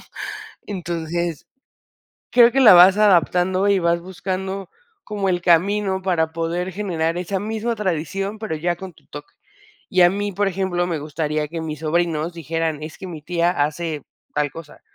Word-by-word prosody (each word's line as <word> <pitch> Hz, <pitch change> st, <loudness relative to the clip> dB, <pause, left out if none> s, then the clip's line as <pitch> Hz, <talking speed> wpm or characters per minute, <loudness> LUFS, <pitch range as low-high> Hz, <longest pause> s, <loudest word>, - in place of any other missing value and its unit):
¿no? -, -, -16 dB, 0.6 s
Entonces, 170 Hz, -3 st, -4 dB, 0.8 s
creo 240 Hz, -1 st, +6 dB
que 270 Hz, -, +2 dB
la 220 Hz, -8 st, +9 dB
vas 185 Hz, +3 st, +8 dB
adaptando 185 Hz, -1 st, +3 dB
y 200 Hz, -, +4 dB
vas 170 Hz, -1 st, +1 dB
buscando 190 Hz, +1 st, -4 dB, 0.4 s
como 205 Hz, -2 st, -2 dB
el 175 Hz, -, 0 dB
camino 190 Hz, +3 st, +2 dB
para 165 Hz, -4 st, 0 dB
poder 170 Hz, +3 st, -2 dB
generar 170 Hz, -4 st, -1 dB
esa 180 Hz, +2 st, -2 dB
misma 220 Hz, +3 st, -2 dB
tradición, 195 Hz, +2 st, -2 dB
pero 210 Hz, -8 st, -4 dB
ya 175 Hz, +2 st, -1 dB
con 185 Hz, 0 st, -9 dB
tu -, -, -25 dB
toque. 145 Hz, 0 st, -11 dB, 0.6 s
Y 185 Hz, -1 st, +4 dB
a 175 Hz, -, +7 dB
mí, 205 Hz, +1 st, -2 dB
por 200 Hz, +2 st, +1 dB
ejemplo, 180 Hz, -2 st, -1 dB
me 170 Hz, -3 st, -2 dB
gustaría 150 Hz, 0 st, -2 dB
que 165 Hz, +2 st, -5 dB
mis 155 Hz, -1 st, -5 dB
sobrinos 165 Hz, 0 st, 0 dB
dijeran: 165 Hz, -1 st, -2 dB
"Es 155 Hz, +1 st, -8 dB
que 190 Hz, -, -7 dB
mi 160 Hz, -4 st, -8 dB
tía 170 Hz, +1 st, +1 dB
hace 155 Hz, 0 st, -2 dB, 0.3 s
tal 150 Hz, -1 st, 0 dB
cosa", 165 Hz, -3 st, -11 dB
175 Hz, 170 wpm, -21 LUFS, 165-195 Hz, 0.8 s, la